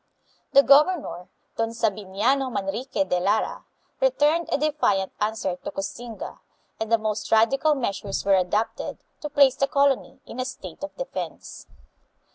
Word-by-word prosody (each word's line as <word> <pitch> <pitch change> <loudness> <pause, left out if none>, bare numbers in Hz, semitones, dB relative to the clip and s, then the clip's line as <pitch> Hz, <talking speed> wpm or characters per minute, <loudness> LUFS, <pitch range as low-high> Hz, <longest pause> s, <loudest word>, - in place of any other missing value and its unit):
The 275 - +8
governor, 285 - +3 0.3
Don 225 0 0
Sabiniano 225 +4 0
Manrique 240 +7 -2
de 180 - +1
Lara, 200 +4 0 0.3
returned 340 -10 +2
a - - +3
defiant 285 -11 +1
answer 210 -4 -1
to - - -6
Koxinga, 225 +4 -6 0.4
and 220 0 -3
the 230 - +6
most 215 -1 -3
radical 270 +7 +4
measures 200 -6 -3
were 200 - +4
adopted 195 +4 0 0.2
to 300 - -5
place 280 -3 +5
the 275 - +2
colony 280 -1 +1
in 250 - -9
a 255 - -1
state 225 - -8
of 290 - -6
defense. - - -6
230 Hz, 140 wpm, -25 LUFS, 200-280 Hz, 0.4 s, The